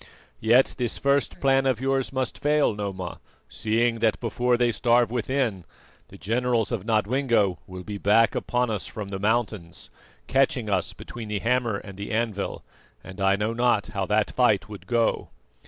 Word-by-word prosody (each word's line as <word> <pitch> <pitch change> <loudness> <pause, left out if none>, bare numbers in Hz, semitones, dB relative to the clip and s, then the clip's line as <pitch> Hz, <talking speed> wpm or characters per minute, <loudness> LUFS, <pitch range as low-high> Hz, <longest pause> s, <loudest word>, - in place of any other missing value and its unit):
Yet 120 +4 +4
this 120 -2 -1
first 140 0 +1
plan 135 0 +3
of 130 -3 +1
yours 135 0 0
must 130 -2 -2
fail, 150 -4 +2
Noma, 95 -4 -5 0.3
seeing 115 +1 0
that 110 -1 +1
before 120 +1 +1
they 120 -1 +2
starve 120 0 +2
within, 120 -5 -1 0.4
the - - -13
generals 115 +2 0
of 110 -5 -3
Nodwengo 110 -3 +1
will 90 0 -8
be 100 +1 -6
back 110 +4 +4
upon 125 -1 -1
us 105 -3 -3
from 105 -2 -7
the 95 -1 -4
mountains, 105 -5 -2 0.3
catching - - +1
us - - 0
between 115 -2 -9
the 105 -1 -2
hammer 115 0 0
and 100 -1 -11
the 100 - -5
anvil, 110 -3 -2 0.4
and 95 +1 -9
I 95 0 +4
know 105 +3 -1
not 120 -3 +1
how 100 -3 -3
that 105 0 +1
fight 120 -6 +2
would 105 -2 -11
go." 115 -2 0
115 Hz, 170 wpm, -25 LUFS, 100-125 Hz, 0.4 s, Yet